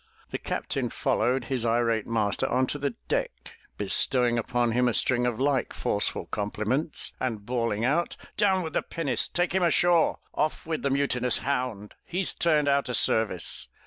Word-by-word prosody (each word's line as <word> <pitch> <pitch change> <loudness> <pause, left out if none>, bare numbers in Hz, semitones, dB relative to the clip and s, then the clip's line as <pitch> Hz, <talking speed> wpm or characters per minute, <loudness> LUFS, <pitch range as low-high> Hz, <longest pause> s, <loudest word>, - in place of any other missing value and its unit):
The - - -3
Captain - - -3
followed 130 +1 0
his 125 -1 -2
irate 115 -1 +1
master 115 +2 0
onto 130 +3 0
the 140 -4 -2
deck, - - -3 0.2
bestowing 120 +4 +2
upon 120 +1 0
him 125 +2 +2
a 120 - +1
string 125 -1 +3
of 120 -1 -2
like 135 -2 +1
forceful - - -1
compliments 110 +8 -2
and 110 -5 -3
bawling 115 -2 -1
out: 160 +7 0 0.2
"Down 190 -3 +2
with 160 - -5
the - - +1
pinnace! 150 -7 -2
Take 175 0 -1
him 190 - +2
ashore! 175 -1 +3 0.2
Off 155 +1 -1
with 160 -1 -2
the 140 - 0
mutinous 130 -3 +1
hound! 125 -7 -3
He's 180 +1 0
turned 155 -4 +2
out 140 -2 +2
o' - - -2
service!" 110 -6 +2
125 Hz, 165 wpm, -27 LUFS, 115-145 Hz, 0.2 s, string